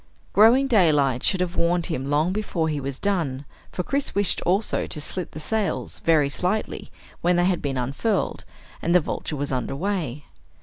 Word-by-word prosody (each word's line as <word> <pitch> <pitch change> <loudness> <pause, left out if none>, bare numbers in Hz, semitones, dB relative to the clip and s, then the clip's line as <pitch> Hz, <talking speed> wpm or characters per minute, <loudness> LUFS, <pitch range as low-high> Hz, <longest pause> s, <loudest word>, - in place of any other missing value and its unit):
Growing 230 +7 +6
daylight 150 - +3
should 190 -2 +1
have 180 0 -2
warned 170 0 +1
him 140 -6 -3
long 155 +5 +2
before 190 -6 -1
he 150 -2 -1
was 135 -1 -4
done, 160 -9 -1 0.3
for 180 - -3
Chris 280 +8 -1
wished 200 -2 +1
also 195 +5 +1
to 155 - -4
slit 180 +4 -3
the - - -6
sails, 215 +6 -1
very 155 -4 +3
slightly, 180 +9 -2 0.3
when 175 +1 +3
they 175 0 +3
had 185 -1 +1
been 135 -2 -2
unfurled 140 - -1 0.4
and 170 - +1
the - - +8
Vulture 155 -1 -4
was 145 0 -3
under 130 +1 -2
way. 155 -5 -3
170 Hz, 180 wpm, -24 LUFS, 145-195 Hz, 0.4 s, the